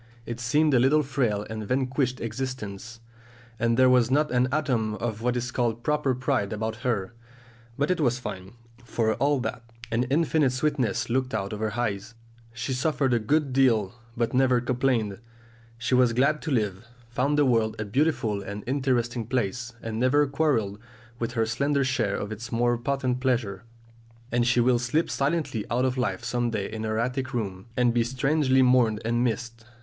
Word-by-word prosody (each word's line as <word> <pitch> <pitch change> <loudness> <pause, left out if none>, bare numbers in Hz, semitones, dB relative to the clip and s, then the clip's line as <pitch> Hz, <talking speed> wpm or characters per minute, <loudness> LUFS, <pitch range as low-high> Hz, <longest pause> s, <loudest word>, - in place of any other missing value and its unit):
It 120 0 -5
seemed 145 +6 +2
a 125 - +5
little 145 +5 +4
frail 120 -7 -1
and 110 -1 -5
vanquished 130 0 0
existence, 115 -2 -5 0.6
and 115 0 +2
there 130 0 +6
was 125 -2 +4
not 150 +2 +2
an 125 0 +3
atom 125 -8 0
of 110 +1 -4
what 125 +1 0
is 120 0 -3
called 120 -2 -1
proper 150 -3 +1
pride 125 -5 -1
about 110 +1 -3
her; 115 -3 -2 0.6
but 145 +5 +1
it 180 - 0
was 125 -3 +2
fine, 95 -6 -7 0.3
for 115 -2 0
all 145 0 +2
that! 120 - -4 0.3
An 115 +2 +1
infinite 150 -1 +2
sweetness 130 -4 0
looked 130 -1 0
out 100 0 -2
of 105 - -5
her 110 +1 -2
eyes; 110 -1 -2 0.4
she 115 +3 -3
suffered 135 0 +1
a 120 - +3
good 140 +4 +1
deal, 120 -7 +3 0.2
but 115 -1 0
never 130 -1 +4
complained. 120 -5 0 0.6
She 120 +2 -2
was 125 -2 +4
glad 140 +5 +2
to 160 - -4
live, 105 -5 0 0.3
found 135 +4 +1
the 145 - +4
world 115 -4 +2
a 110 - -3
beautiful 110 -3 0
and 100 +1 -6
interesting 125 -3 0
place, 120 -1 -2
and 110 0 -4
never 135 +4 +4
quarrelled 135 -9 0 0.4
with 115 0 -2
her 115 -2 +1
slender 140 +5 +1
share 120 -6 0
of 105 - -4
its 110 +2 -7
more 120 +1 +2
potent 125 +1 -1
pleasures. 120 -7 0 0.7
And 120 0 +2
she 125 0 +3
will 120 0 +3
slip 125 +7 0
silently 140 -6 -1
out 125 +3 +1
of 130 -1 0
life 125 -1 -2
some 120 -1 0
day 105 -4 -2
in 110 0 -4
her 110 0 -1
attic 125 +2 -2
room; 100 -3 -4
and 120 -1 +3
be 120 -1 +3
strangely 130 +2 +2
mourned 125 -4 +4
and 120 +1 +1
missed. 115 -1 -3
120 Hz, 180 wpm, -26 LUFS, 110-130 Hz, 0.7 s, there